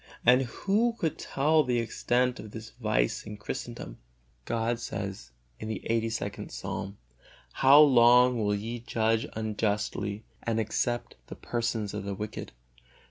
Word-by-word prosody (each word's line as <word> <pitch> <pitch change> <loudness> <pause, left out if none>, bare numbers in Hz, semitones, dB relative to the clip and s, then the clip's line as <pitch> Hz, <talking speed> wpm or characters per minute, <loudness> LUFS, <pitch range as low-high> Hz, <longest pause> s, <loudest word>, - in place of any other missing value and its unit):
And 125 +2 +6
who 205 - 0
could 160 -3 -2
tell 155 +3 +2
the 125 -2 0
extent 120 +2 0
of 110 - -8
this 110 +1 -9
vice - - 0
in 105 0 -8
Christendom? 100 - -6 0.5
God 115 0 -1
says 100 -4 -5 0.3
in - - -6
the 110 - -3
lxxxii. 115 -3 -2
Psalm, 100 +1 -5 0.6
"How 135 +2 +7
long 125 -3 +6
will 105 -1 +1
ye 115 +4 -4
judge 115 -1 0
unjustly, 105 -1 -2 0.2
and 115 -1 -1
accept 120 +2 -1
the - - -8
persons 115 -3 -2
of - - -4
the 100 0 -4
wicked? 105 +2 -6
115 Hz, 135 wpm, -28 LUFS, 105-125 Hz, 0.6 s, How